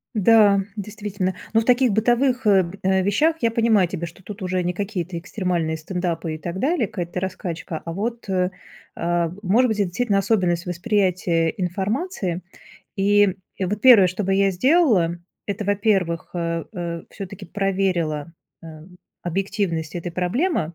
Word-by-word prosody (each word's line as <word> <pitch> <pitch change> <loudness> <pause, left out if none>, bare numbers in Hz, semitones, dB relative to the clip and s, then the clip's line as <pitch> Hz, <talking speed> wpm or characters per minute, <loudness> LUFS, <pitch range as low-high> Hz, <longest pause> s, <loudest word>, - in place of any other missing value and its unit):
Да, 210 -1 +5 0.2
действительно, 200 -3 -3 0.2
но 225 - +5
в - - -5
таких 250 0 +4
бытовых, 240 +3 +2
э, 195 -2 +6
б 170 +3 -8 0.3
вещах, 300 - +2
я 230 - +2
понимаю 225 -5 +3
тебя, 170 -1 -4
что 170 +3 -15
тут 210 +2 -9
уже 185 0 -1
не 180 +1 -1
какие-то 185 -3 -3
экстремальные 175 -3 -2
стендапы 165 -1 -3
и 155 - -5
так 170 +3 -5
далее, 275 - +1
какая-то 175 -1 -4
раскачка, 180 -3 -4
а 165 - -4
вот, 230 +5 -4
э, 185 -1 +1 0.5
э, 170 0 0
может 230 +7 +4
быть 220 - -1
это 205 - +2
действительно 205 +2 0
особенность 180 -4 +1
восприятия 180 -3 +1
информации. 190 - -2 0.6
И 205 -1 +4 0.2
вот 195 +2 -2
первое, 230 -8 +8
что 185 +4 -3
бы 195 0 +1
я 195 0 +3
сделала, 210 - +3 0.3
это 205 +1 -3
во-первых, 195 -4 0
э, 170 -1 -2
э, 170 -4 -5
всё-таки 195 -1 -8
проверила, 180 -5 -1 0.3
э, - - -10 0.6
объективность 175 -3 -2
этой 175 0 -4
проблемы. 180 - 0
190 Hz, 150 wpm, -22 LUFS, 175-210 Hz, 0.6 s, первое